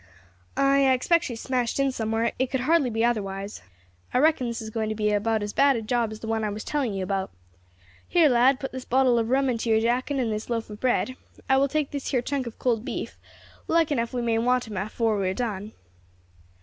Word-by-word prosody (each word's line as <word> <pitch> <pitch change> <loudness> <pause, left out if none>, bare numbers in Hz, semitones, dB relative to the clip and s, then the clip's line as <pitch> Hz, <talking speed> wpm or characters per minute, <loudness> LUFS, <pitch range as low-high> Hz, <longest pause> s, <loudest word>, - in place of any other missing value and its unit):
"Ay, 275 0 +4
I 260 - +5
expect 335 +7 +2
she 250 - -4
is 225 - -7
smashed 250 -2 -1 0.2
somewhere; 225 0 0
it 260 -1 +1
could 265 -1 -1
hardly 300 -1 +3
be 225 0 +1
otherwise; 200 -3 -2 0.5
I - - +5
reckon 290 -2 +3
this 235 -1 -3
is 220 -1 -7
going 220 -1 -2
to 215 - -2
be 210 0 0
about 215 +1 +1
as 205 - -4
bad 280 -1 +4
a 230 - -2
job 230 0 0
as 215 - -9
the 225 - -6
one 225 0 -1
I 210 - 0
was 210 +1 -5
telling 270 -9 -1
you 190 - -2
about. 190 0 -2 0.8
Here, 340 -3 +4
lad, 255 +1 +4
put 270 - -5
this 260 -1 -6
bottle 255 -1 +3
of 225 0 -1
rum 270 +2 +2
into 235 -2 -1
your 220 0 +4
jacket 250 +5 0
and 240 -4 0
this 215 +2 -4
loaf 230 -2 -3
of 210 - -9
bread; 255 0 0 0.3
I 265 -1 +4
will 275 +1 +3
take 300 0 -1
this 280 -2 -4
here 255 -4 +1
chunk 270 -1 -2
of 230 - -8
cold 230 -3 0
beef; - - -5 0.5
like 330 -2 +2
enough 235 -4 0
we 245 -2 -2
may 230 -1 +1
want 250 +1 +1
'em 210 -3 -6
afore 215 +2 0
we 190 -1 0
are 190 - -3
done." 210 -3 -3
235 Hz, 240 wpm, -25 LUFS, 220-265 Hz, 0.8 s, I